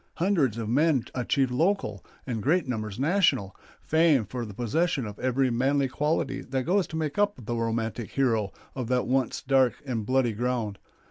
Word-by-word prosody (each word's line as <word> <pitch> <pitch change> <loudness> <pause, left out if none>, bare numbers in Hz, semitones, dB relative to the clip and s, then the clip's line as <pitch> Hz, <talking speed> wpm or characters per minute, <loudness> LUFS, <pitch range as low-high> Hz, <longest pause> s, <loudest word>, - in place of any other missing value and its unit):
Hundreds 165 - +1
of 115 -2 -3
men 140 +2 +3
achieved 130 +1 +1
local, 135 - 0 0.2
and 115 -4 -3
great 155 - +2
numbers 110 -5 -3
national, 140 - +2 0.3
fame 160 -7 +3
for 120 +1 -5
the 105 - -8
possession 135 - 0
of 105 -1 -8
every 130 0 +1
manly 135 +3 +2
quality 150 +4 -1
that 130 0 -2
goes 185 +6 +1
to - - -7
make 155 +3 -2
up 205 0 +2
the 120 - -2
romantic 115 -1 -2
hero 115 -7 +1 0.2
of 125 -3 -4
that 125 0 +1
once 130 -1 0
dark 130 -2 +3
and 120 -5 -2
bloody 130 -3 +2
ground. 115 -3 -2
130 Hz, 175 wpm, -27 LUFS, 115-150 Hz, 0.3 s, men